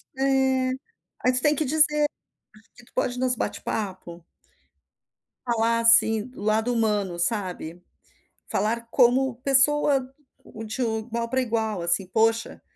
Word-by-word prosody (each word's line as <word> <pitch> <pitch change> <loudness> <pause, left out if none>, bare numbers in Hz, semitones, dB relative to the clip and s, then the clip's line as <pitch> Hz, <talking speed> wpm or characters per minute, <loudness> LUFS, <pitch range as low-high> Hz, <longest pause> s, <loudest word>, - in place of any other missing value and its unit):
É, 265 - -6 1.0
aí 255 - +4
tu 255 - 0
tem 295 +2 +2
que 305 +1 -1
dizer 300 +1 +3 0.7
e 240 - -15
tu - - -26
pode 245 0 -1
nos 255 0 +1
bate-papo. 185 -7 -5 1.2
Falar, 230 -1 +1
assim, 230 0 +4
o - - -10
lado 220 +3 0
humano, 210 -6 -1
sabe. 180 -3 -3 0.7
Falar 230 +2 -2
como 260 0 +3
pessoa, 270 0 +2 0.5
de 220 +4 -5
igual 230 +1 -3
pra 260 +1 0
igual, 220 -5 -2
assim: 170 +3 +1
"Poxa, 225 +3 0
230 Hz, 120 wpm, -24 LUFS, 215-255 Hz, 1.2 s, aí